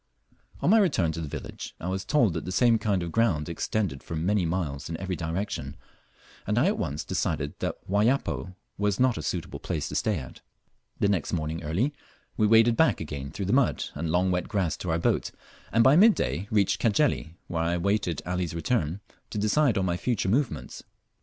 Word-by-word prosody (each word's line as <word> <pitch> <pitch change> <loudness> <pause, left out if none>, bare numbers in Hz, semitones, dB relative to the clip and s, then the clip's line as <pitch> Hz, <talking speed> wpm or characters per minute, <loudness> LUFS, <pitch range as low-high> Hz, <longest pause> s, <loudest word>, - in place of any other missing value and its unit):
On 175 - +3
my 225 - +7
return 95 - +2
to 80 - -5
the 80 - -4
village - - -7
I 85 - -5
was 95 +1 -2
told 120 - +3
that 80 - -3
the 90 - -5
same 115 +3 +4
kind 100 -4 0
of 85 - -4
ground 95 -10 +1
extended 85 -2 -2
for 85 - -6
many 90 +3 +1
miles 80 -6 -3
in 80 - -3
every 95 +1 -3
direction, 80 -5 -4 0.7
and 105 +2 0
I 125 - +4
at 200 +3 +1
once 75 -1 -2
decided 70 0 -2
that - - -2
Wayapo 105 -2 0 0.2
was 105 -1 +1
not 125 -7 +3
a - - -3
suitable 75 - -4
place 80 -4 -3
to - - -6
stay - - +1
at. 65 - -9 0.6
The - - +3
next 95 -6 0
morning 80 0 -2
early 95 - 0 0.4
we 110 - +3
waded 115 +2 +5
back 160 +4 +3
again 70 -3 -5
through 95 +6 -4
the 100 - 0
mud 135 -1 +2
and 80 +2 -3
long 90 +3 +2
wet 90 0 -1
grass 95 -7 0
to 90 - -5
our 80 - +2
boat, 85 - +1 0.4
and 115 +2 +4
by 130 +4 +6
mid 210 +5 +7
day 95 +4 -2
reached 105 -4 +2
Cajeli, 110 - +1
where 85 -2 -2
I 85 +1 +1
waited 95 -3 0
Ali's 90 -2 -2
return 85 - -1 0.3
to - - -5
decide 115 +4 +2
on 95 - +1
my 85 -1 0
future 110 -2 -1
movements. 100 - -1
95 Hz, 205 wpm, -27 LUFS, 80-110 Hz, 0.7 s, my